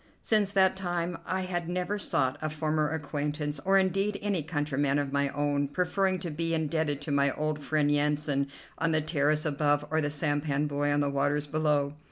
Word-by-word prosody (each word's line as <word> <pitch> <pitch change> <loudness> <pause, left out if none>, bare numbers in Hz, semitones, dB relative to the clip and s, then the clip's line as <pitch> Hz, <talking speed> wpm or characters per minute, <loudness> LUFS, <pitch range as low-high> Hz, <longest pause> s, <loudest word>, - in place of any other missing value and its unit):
Since 210 -3 +3
that 190 -1 +4
time 175 -2 -2
I 185 0 -1
had 175 -2 -3
never 180 +3 -2
sought 130 -6 0
a 155 - -1
former 155 0 0
acquaintance, 150 -1 -3
or 195 +1 +4
indeed 195 +2 +1
any 200 -5 0
countryman 145 -2 0
of 145 -1 -1
my 140 0 +1
own, 145 0 0
preferring 185 +5 0
to 170 - -3
be 165 +2 -1
indebted 155 -2 -1
to 145 - -4
my 140 0 +3
old 155 0 -1
friend 150 0 +1
Yansan 145 -1 +1 0.3
on 165 0 +1
the 155 - +3
terrace 155 0 +1
above 145 0 +1
or 160 0 +2
the 145 - 0
sampan 145 0 0
boy 145 0 -1
on 145 0 +2
the 145 - +1
waters 145 +1 0
below. 150 -1 +1
150 Hz, 190 wpm, -29 LUFS, 145-170 Hz, 0.3 s, that